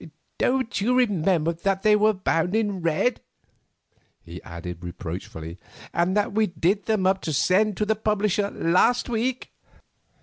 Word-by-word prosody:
Don't 255 -4 0
you 245 +5 +2
remember 180 -8 +2
that 195 +3 -2
they 215 -1 +5
were 215 +1 +4
bound 180 0 0
in 205 -4 0
red?" 170 +9 0 1.0
he 85 +1 -10
added 85 0 -8
reproachfully, 85 -1 -7 0.3
"and 180 +4 +1
that 205 -1 0
we 215 0 +2
did 180 +4 -1
them 215 -4 +1
up 190 0 +2
to 160 - -3
send 190 +7 +2
to 210 - 0
the 220 +1 +1
publisher 210 -1 0
last 195 +11 +2
week?" 240 +2 -2
195 Hz, 145 wpm, -24 LUFS, 165-215 Hz, 1.0 s, they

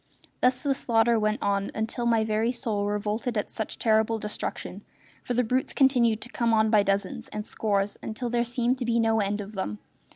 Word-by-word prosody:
Thus 250 +1 +2
the 280 -2 +2
slaughter 230 -2 +2
went 215 0 0
on 200 0 0
until 225 +2 -2
my 225 -2 +3
very 220 +2 +1
soul 220 -5 -2
revolted 210 +3 -2
at 210 - -2
such 220 - -4
terrible 220 -1 +2
destruction, 210 -1 -5 0.4
for 245 - -3
the 250 - +3
brutes 255 +3 0
continued 245 -5 +3
to 245 - -8
come 235 -2 +1
on 220 0 +3
by 215 -2 +6
dozens 195 -1 -1
and 210 0 -6
scores 200 -3 -1
until 235 +2 -4
there 240 0 +2
seemed 245 +1 0
to 250 - -2
be 235 0 +1
no 225 -1 +2
end 205 0 -1
of 205 +1 -9
them. 190 - -3
220 Hz, 200 wpm, -27 LUFS, 210-240 Hz, 0.4 s, by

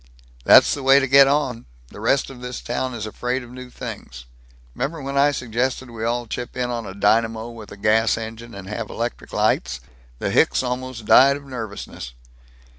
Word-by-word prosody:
"That's - - +7
the 140 - -4
way 135 +1 +6
to 135 - 0
get 135 +1 +7
on. 135 - 0 0.2
The - - -12
rest 130 +5 +1
of 125 -2 -12
this 125 0 -5
town 125 +1 -3
is 110 -2 -5
afraid 125 +4 -3
of 120 - -13
new 125 0 -9
things. 60 - -8 0.5
'Member 150 +6 -3
when 140 0 -5
I 140 +1 +5
suggested 125 -1 -2
we 115 -1 -6
all 120 +1 -1
chip 120 +3 -6
in 125 -1 -1
on 115 -3 -4
a 95 - -8
dynamo 110 +2 +1
with 115 -3 -11
a 100 - -10
gas 110 +3 +2
engine 115 0 -8
and 100 -1 -9
have 105 - -5
electric 120 +1 -5
lights? - - 0 0.4
The - - -2
hicks - - +3
almost 125 -2 -4
died 140 +5 +6
of 140 - -13
nervousness." 110 - -7
120 Hz, 190 wpm, -22 LUFS, 110-130 Hz, 0.5 s, That's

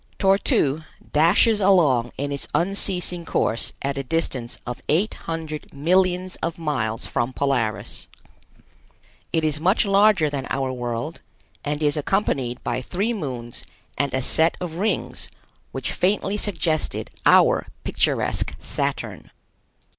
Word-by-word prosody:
Tor 195 0 +4
tu 145 -5 +2 0.3
dashes 180 +8 +5
along 150 -12 +4
in 145 +1 -2
its 140 - 0
unceasing 180 -1 0
course 115 -7 0
at 140 0 -1
a - - -2
distance 130 -4 -2
of 125 -1 -5
eight 180 +9 +2
hundred 160 -2 -6
millions 180 +4 +1
of 165 0 -3
miles 130 -9 -2
from 120 +2 -1
Polaris. 125 -7 -1 1.2
It 160 - +1
is 150 -1 +2
much 190 +7 +3
larger 200 -4 +5
than 140 -3 -3
our 135 -1 -1
world, 120 +5 -4 0.4
and 150 +1 -2
is 145 0 +2
accompanied 140 - 0
by 120 +1 -1
three 200 - -1
moons 125 - -5 0.3
and 140 -1 0
a 130 0 -1
set 160 +5 +2
of 170 -2 -5
rings 210 +4 -1 0.4
which - - -3
faintly 195 +2 +1
suggested 175 -7 -1 0.2
our - - +5 0.2
picturesque - - 0
Saturn. - - -3
155 Hz, 130 wpm, -23 LUFS, 130-185 Hz, 1.2 s, dashes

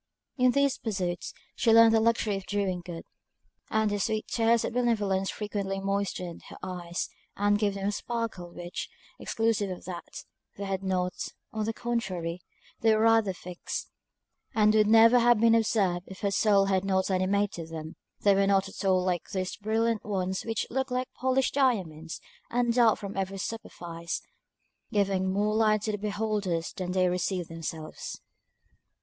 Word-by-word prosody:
In 255 -2 +4
these 280 -1 +2
pursuits 185 -6 -2 0.2
she 230 - +3
learned 225 0 +8
the 225 - +5
luxury 225 -2 +2
of 195 -1 -6
doing 190 -2 -1
good; 170 -2 -7 0.7
and 220 -1 +1
the 205 - -1
sweet 215 +2 -1
tears 230 0 +2
of - - -3
benevolence 205 -6 +1
frequently 200 -2 -3
moistened 195 -3 -2
her - - -10
eyes, 175 -2 -3 0.3
and 205 0 +3
gave 205 -2 +1
them 195 0 -2
a - - +2
sparkle 225 -5 -4
which, 175 0 -6 0.3
exclusive 225 -3 0
of 185 - -7
that, 175 -1 -7 0.3
they 200 - -5
had 195 -1 -2
not; 180 -2 0 0.4
on 215 -1 -1
the 225 - 0
contrary, 185 -8 -3 0.4
they 225 -1 +4
were 215 - +2
rather 225 -3 +4
fixed, 180 0 -6 0.6
and 215 -1 +5
would 215 -1 +4
never 225 +2 +7
have 240 -1 +5
been 230 0 +5
observed 200 -6 +2
if 190 - -10
her 200 - +1
soul 200 -1 +4
had 190 -1 +1
not 190 0 +1
animated 185 -2 0
them. 160 0 -7 0.3
They 200 - +5
were 195 0 +3
not 195 -1 +3
at 195 - -8
all 185 -2 +3
like 180 -2 -1
those 185 0 -2
brilliant 225 +1 0
ones 190 -2 -1
which 225 -2 -2
look 265 +2 -1
like 255 0 -2
polished 260 0 +1
diamonds, 185 - 0 0.3
and 240 0 +1
dart 230 -2 +5
from 200 -1 -7
every 195 0 -2
superfice, 170 -6 -5 0.7
giving 195 -3 +1
more 205 +2 +1
light 215 -1 +3
to 215 - 0
the 210 - -3
beholders 205 -5 -1
than 180 -1 -4
they 185 -1 +3
receive 180 0 -1
themselves. 160 -1 -6
200 Hz, 165 wpm, -28 LUFS, 185-225 Hz, 0.7 s, learned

